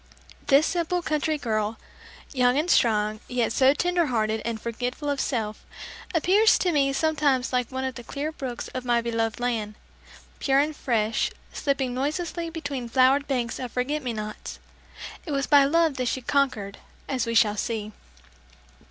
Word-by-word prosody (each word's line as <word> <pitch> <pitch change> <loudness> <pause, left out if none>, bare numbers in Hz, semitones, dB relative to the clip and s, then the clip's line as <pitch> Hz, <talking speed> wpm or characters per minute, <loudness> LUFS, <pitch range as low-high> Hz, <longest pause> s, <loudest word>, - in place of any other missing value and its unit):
This 285 +2 +5
simple 350 0 -1
country 305 0 0
girl, 220 -4 -1 0.6
young 250 -1 +3
and 325 +4 +1
strong, 215 -2 +2
yet 245 -2 0
so 265 +2 +5
tender 355 0 +1
hearted 220 -3 0
and 230 -1 -3
forgetful 245 +6 -3
of 280 - -1
self, 215 -5 -2 0.5
appears 395 +7 +5
to 360 - +1
me 280 -3 +2
sometimes 275 -3 +1
like 250 -1 0
one 260 0 -3
of 260 0 -2
the 240 - -9
clear 285 +6 -4
brooks 260 -6 -5
of 255 - -5
my 240 -1 +2
beloved 230 -1 -1
land, 225 -4 -2 0.6
pure 270 -1 +2
and 295 +2 +2
fresh, 225 -5 0 0.2
slipping 275 -3 -1
noiselessly 330 +5 -2
between 285 -7 -5
flowered 265 +3 +4
banks 245 -4 -2
of 250 -3 -5
forget 280 +5 -1
me 250 -3 -3
nots. 215 -1 -6 0.7
It 300 - -2
was 275 0 0
by 285 -2 +6
love 320 0 +2
that 255 -1 -1
she 260 - -1
"conquered" 240 -8 0 0.3
as 260 -3 -1
we 230 - -1
shall 210 -2 +4
see! 215 0 -3
260 Hz, 165 wpm, -25 LUFS, 230-290 Hz, 0.7 s, by